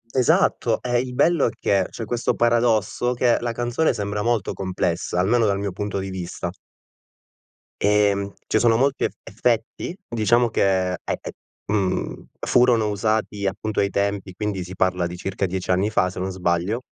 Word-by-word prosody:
Esatto, 130 -2 +3
e 120 -1 +1
il 125 0 -3
bello 165 +2 +3
è - - +1
che, 95 -3 +1
c'è 115 - -6
questo 120 +2 0
paradosso 120 0 +2
che 120 -1 +3
la 120 0 -2
canzone 120 +7 0
sembra 105 -2 -3
molto 115 -3 0
complessa, 90 -2 -2
almeno 110 +5 +3
dal 100 -2 +1
mio 100 -1 -2
punto 100 +2 -4
di 95 0 -4
vista. 90 -2 -5 1.3
Ehm, 100 -1 +2 0.2
ci 110 - +2
sono 115 0 +4
molti 135 +3 +1
ef - - -4
effetti, 115 - -1
diciamo 120 +1 +2
che 95 -3 +1
è - - -3
è, - - -3 0.6
mhmm, 100 -3 -1
furono 120 -3 +3
usati 105 0 -1
appunto 110 +2 -2
ai 100 - +2
tempi, 100 -1 -2
quindi 100 -1 -3
si 90 +1 -9
parla 90 -1 +1
di 90 +1 -7
circa 95 +1 -2
10 95 0 -2
anni 95 +3 +2
fa 90 -3 +2
se 90 - -8
non 95 +1 -2
sbaglio. 90 +5 -1
105 Hz, 170 wpm, -23 LUFS, 95-120 Hz, 1.3 s, sono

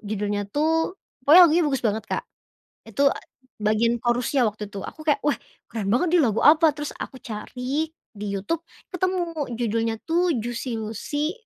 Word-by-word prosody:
judulnya 205 -1 -3
tuh 325 - 0 0.2
pokoknya 300 +8 +8
lagunya 335 +1 +4
bagus 270 -3 -1
banget 220 0 0
Kak, - - -2 0.6
itu 225 +6 -1 0.5
bagian 215 +2 +2
chorus-nya 245 +2 +2
waktu 210 -2 -2
itu 200 -1 -7
aku 310 0 -9
kayak, 295 - +2
"Wah 295 0 +1 0.3
keren 215 -4 -3
banget 245 - +2
nih - - +6
lagu 215 - 0
apa?" 310 0 +6
Terus 295 -1 -4
aku - - -6
cari 250 +7 -3 0.2
di 210 -1 -7
Youtube 305 - -2 0.3
ketemu 370 0 0 0.3
judulnya 225 -1 0
tuh, 340 -1 +1
Juicy 240 +1 -3
Luicy 290 - -2
245 Hz, 155 wpm, -24 LUFS, 215-310 Hz, 0.6 s, pokoknya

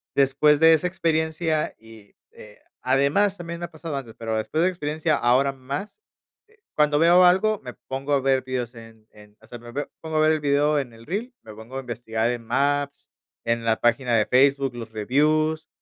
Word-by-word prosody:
después 140 +2 +3
de 160 +1 +7
esa 160 +2 +1
experiencia 160 -2 -1
y, 110 -2 -16 0.2
eh 105 -1 -15 0.2
además, 140 +10 +2
también 170 -1 -7
me 175 - -4
ha - - -12
pasado 160 -1 -6
antes, 120 -5 -8
pero 110 -1 -3
después 130 +9 -1
de 175 - +4
esa - - -3
experiencia 155 -1 -1
ahora 130 +3 +2
más, 140 - -7 0.5
eh, 445 +1 -28 0.2
cuando 150 -1 +3
veo 175 +3 +6
algo, 190 +4 +3
me 125 -2 -8 0.2
pongo 135 +2 -3
a 140 - +2
ver 135 -1 +1
vídeos 125 -2 -4
en 115 -1 -15
en 105 0 -18
o 110 - -19
sea, 120 - -9
me 120 0 -12
veo 145 +3 -4
pongo 160 -1 -4
a - - +3
ver 155 0 +4
el 155 - -1
vídeo 145 +1 +2
en 125 -4 -6
el 115 0 -15
reel, 225 +8 -4
me 110 - -12
pongo 115 +5 -9
a - - -3
investigar 115 -2 -3
en 120 -1 -6
Maps, 140 +3 -1 0.3
en 115 0 -1
la 110 -1 +1
página 120 +1 +2
de 110 -2 +3
Facebook, 135 0 +2
los 115 -2 -8
reviews, 155 +8 +1
140 Hz, 210 wpm, -24 LUFS, 120-155 Hz, 0.5 s, de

